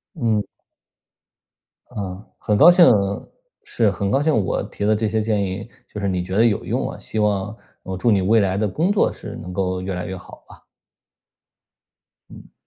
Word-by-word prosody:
嗯。 115 -8 0 1.5
嗯。 95 -1 -6 0.2
很 105 - 0
高 160 +8 +8
兴 175 -1 +7 0.8
是， 115 -3 +1
很 100 +1 -2
高 135 - +2
兴 155 +1 +2
我 - - -1
提 100 - -5
的 110 - +3
这 110 +1 -1
些 110 +1 0
建 105 -1 0
议， 95 +2 -4 0.2
就 105 - -8
是 100 - -1
你 90 -2 -1
觉 95 +1 -5
得 115 - +4
有 110 -4 +1
用 - - -1
啊。 - - -8
希 110 - -5
望 105 0 0 0.3
我 95 -1 -5
祝 115 - +1
你 100 - +3
未 110 +5 +3
来 95 -2 +1
的 105 +1 +1
工 160 - 0
作 205 - +2
是 - - -9
能 90 +2 -8
够 90 -1 -1
越 95 +1 -4
来 90 0 -4
越 95 - -5
好 90 - -13
了。 - - -16 1.7
嗯。 - - -14
105 Hz, 205 characters per minute, -21 LUFS, 95-110 Hz, 1.7 s, 高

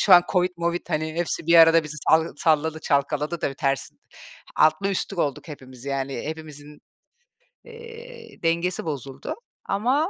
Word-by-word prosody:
Şu 190 - +7
an 175 - +8
COVID 180 -1 +2
movid, 170 +1 -2
hani, 155 -1 -2
hepsi 170 -1 -2
bir 170 - +4
arada 165 0 +7
bizi 150 0 -6
sal 160 +1 +4
salladı, 160 0 +1
çalkaladı 150 +3 0
da - - +2
bir 135 - -8
ters 135 -1 -1 0.7
Altlı 155 +6 +3
üstlük 195 -1 -3
olduk 145 +2 -2
hepimiz 130 -3 -11
yani. 135 -1 -3
Hepimizin, 150 -1 -8 0.9
eee, 465 - -12
dengesi 170 +2 0
bozuldu 135 -3 -5 0.3
ama 255 - +1
160 Hz, 150 wpm, -24 LUFS, 145-180 Hz, 0.9 s, an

